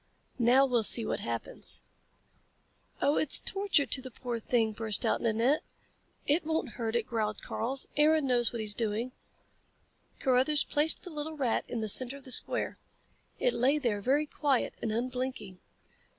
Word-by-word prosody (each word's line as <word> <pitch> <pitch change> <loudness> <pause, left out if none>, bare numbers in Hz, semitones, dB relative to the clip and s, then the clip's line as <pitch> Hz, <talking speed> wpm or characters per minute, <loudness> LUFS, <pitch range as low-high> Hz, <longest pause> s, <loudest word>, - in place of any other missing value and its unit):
"Now 250 +3 +4
we'll 245 -3 +1
see 225 +1 +5
what - - -3
happens." 115 -1 -1 1.2
"Oh, 285 - +2
it's 305 - +7
torture 390 -7 0
to 260 - -2
the 260 - -9
poor 240 0 -5
thing," 225 -1 0
burst 215 -1 0
out - - 0
Nanette. 235 +6 +1 0.6
"It 295 +5 +1
won't 320 -3 -2
hurt 230 0 -4
it," 235 -2 0
growled 215 -3 -3
Karl. 260 +4 -3 0.2
"Aaron 305 0 +3
knows 245 -2 +1
what 235 - -5
he's 210 -1 -1
doing." 225 +3 -2 1.1
Carruthers 270 +3 +2
placed 300 +2 +1
the 360 - -8
little 310 +1 -6
rat 255 -5 -1
in 235 - -4
the 220 - -2
center 255 +5 +3
of 280 - -16
the 260 - -6
square. - - +1 0.6
It - - 0
lay 270 +5 +2
there, 235 -8 -1
very 280 +7 +1
quiet 285 -3 -1
and 225 - -2
unblinking. 250 -5 -4
250 Hz, 165 wpm, -29 LUFS, 225-285 Hz, 1.2 s, it's